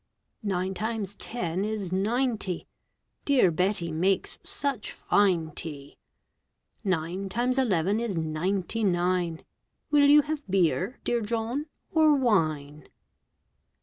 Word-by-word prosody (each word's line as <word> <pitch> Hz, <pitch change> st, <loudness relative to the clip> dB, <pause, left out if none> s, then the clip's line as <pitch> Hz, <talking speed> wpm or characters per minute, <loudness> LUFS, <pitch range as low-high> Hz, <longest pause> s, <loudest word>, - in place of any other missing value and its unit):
Nine 190 Hz, -3 st, -1 dB
times 215 Hz, -1 st, -3 dB
ten 185 Hz, -6 st, -3 dB
is 210 Hz, -4 st, -3 dB
ninety. 215 Hz, -1 st, 0 dB, 0.6 s
Dear 255 Hz, -11 st, +4 dB
Betty 180 Hz, 0 st, 0 dB
makes 180 Hz, +4 st, 0 dB
such 275 Hz, -7 st, -3 dB
fine 180 Hz, -6 st, +2 dB
tea! 145 Hz, -3 st, -7 dB, 0.8 s
Nine 185 Hz, 0 st, -1 dB
times 250 Hz, +5 st, 0 dB
eleven 200 Hz, -4 st, +2 dB
is 230 Hz, -6 st, -2 dB
ninety 180 Hz, +7 st, -1 dB
nine. 175 Hz, -3 st, 0 dB, 0.5 s
Will 290 Hz, -1 st, +6 dB
you 295 Hz, 0 st, +7 dB
have 300 Hz, 0 st, -3 dB
beer, 185 Hz, -, +1 dB
dear 240 Hz, -1 st, 0 dB
John, 230 Hz, +7 st, -2 dB, 0.2 s
or 310 Hz, -2 st, +5 dB
wine? 155 Hz, -, 0 dB
195 Hz, 110 wpm, -27 LUFS, 175-235 Hz, 0.8 s, you